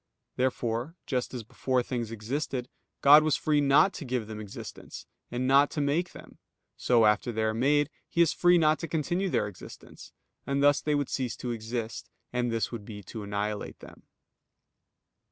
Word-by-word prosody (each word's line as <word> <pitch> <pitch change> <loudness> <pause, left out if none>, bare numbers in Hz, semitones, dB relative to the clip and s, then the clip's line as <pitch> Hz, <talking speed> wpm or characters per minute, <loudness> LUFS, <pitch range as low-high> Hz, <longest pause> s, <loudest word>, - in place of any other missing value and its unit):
Therefore, 125 +3 -1
just 125 -3 -2
as 125 -3 -6
before 125 +3 -1
things 120 -3 -3
existed, 125 +3 -4 0.3
God 145 +2 +9
was 155 -1 +2
free 150 -1 +1
not 145 +7 +4
to 175 - -7
give 125 -4 -2
them 110 0 -7
existence, 105 -2 -9 0.2
and 125 +1 -2
not 140 +2 +5
to - - -4
make 150 +5 0
them; - - -14 0.4
so 120 -3 +3
after 105 +3 +2
they 110 -1 -1
are 110 0 +1
made, 145 +5 +2 0.2
He - - -4
is 165 - +1
free 175 0 +4
not 155 -2 +3
to 165 - -4
continue 175 +5 -1
their 105 - 0
existence; 100 -3 -12 0.4
and 140 0 0
thus 145 0 +5
they 150 -1 0
would 145 -2 -1
cease 130 -3 -2
to 125 - -5
exist; 115 0 -5 0.2
and 125 -1 0
this 115 -1 -1
would 115 -3 -6
be 105 -1 -9
to 110 +4 -8
annihilate 105 +1 -3
them. - - -14
125 Hz, 180 wpm, -28 LUFS, 115-145 Hz, 0.4 s, God